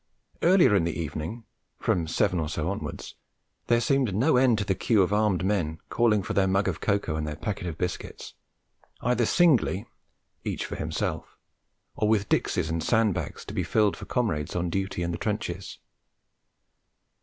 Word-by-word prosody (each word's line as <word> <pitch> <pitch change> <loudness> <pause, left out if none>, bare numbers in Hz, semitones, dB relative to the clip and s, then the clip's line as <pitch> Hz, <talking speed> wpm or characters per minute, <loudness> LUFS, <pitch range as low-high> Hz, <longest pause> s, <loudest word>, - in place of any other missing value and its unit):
Earlier 175 - +5
in 95 - +3
the 85 0 -2
evening, 80 +8 -4 0.3
from 85 -2 0
seven 90 +2 +1
or 75 -2 -2
so 80 +1 -2
onwards, 100 - -6 0.5
there 120 0 +4
seemed 130 -5 +1
no 130 +9 +3
end 125 -3 +4
to 105 - -1
the 95 - +1
queue 100 +2 +3
of 95 - -1
armed 105 -4 +2
men, 90 -6 0
calling 110 -4 +2
for - - -3
their 95 -1 +3
mug 95 +1 +1
of 85 -4 -2
cocoa 100 -6 0
and 75 -1 -3
their 75 - -4
packet 95 +1 -4
of 80 -3 -5
biscuits, 90 -1 -5 0.7
either 120 -1 +1
singly, 130 - +3 0.6
each - - -3
for - - -5
himself, - - -3 0.6
or 105 - 0
with 105 -2 +1
dixies - - +1
and 80 0 -2
sand 110 -1 +3
bags 85 -4 -5
to - - -8
be - - 0
filled 105 -3 +2
for - - -9
comrades 85 - -1
on 90 -1 -1
duty 95 -2 -2
in 85 - -1
the 85 - -4
trenches. 95 -3 -3
100 Hz, 180 wpm, -27 LUFS, 85-110 Hz, 0.7 s, Earlier